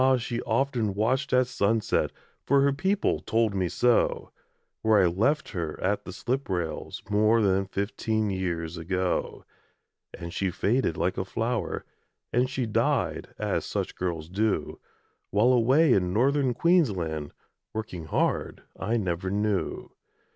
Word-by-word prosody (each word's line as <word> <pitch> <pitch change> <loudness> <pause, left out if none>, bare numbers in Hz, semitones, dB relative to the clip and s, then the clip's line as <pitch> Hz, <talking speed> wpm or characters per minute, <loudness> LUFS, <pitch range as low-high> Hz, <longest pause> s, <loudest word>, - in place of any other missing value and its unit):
she 120 0 -3
often 125 -7 0
watched 130 +6 0
at 125 0 +4
sunset 110 -2 +1 0.3
For 140 0 +3
her 140 0 +3
people 190 +8 +1
told 115 -2 +1
me 95 -3 0
so 120 +5 +1 0.5
Where 110 -3 +4
I - - +5
left 115 - +1
her 85 -6 -4
at 100 +2 -1
the - - -6
slip 125 +7 -3
rails 85 -4 -3
More 105 +2 +3
than 95 -2 +2
fifteen 105 +2 -1
years 85 -3 -3
ago. 90 +2 -2 0.7
And 85 0 -7
she 95 - 0
faded 100 0 0
like 90 +2 0
a - - 0
flower, 115 +5 -2 0.5
And 125 +2 +2
she 135 -2 -2
died, 110 - 0
as - - -1
such - - -3
girls 85 -4 -3
do, 100 -3 -1 0.5
While, 110 +6 +4
away 130 +5 +4
in 90 -2 +1
Northern 130 +4 +2
Queensland, 95 - +1 0.4
Working 100 -7 -5
hard, 80 - -1 0.2
I 110 +5 0
never 90 -3 -2
knew. 105 0 -1
105 Hz, 140 wpm, -27 LUFS, 90-125 Hz, 0.7 s, I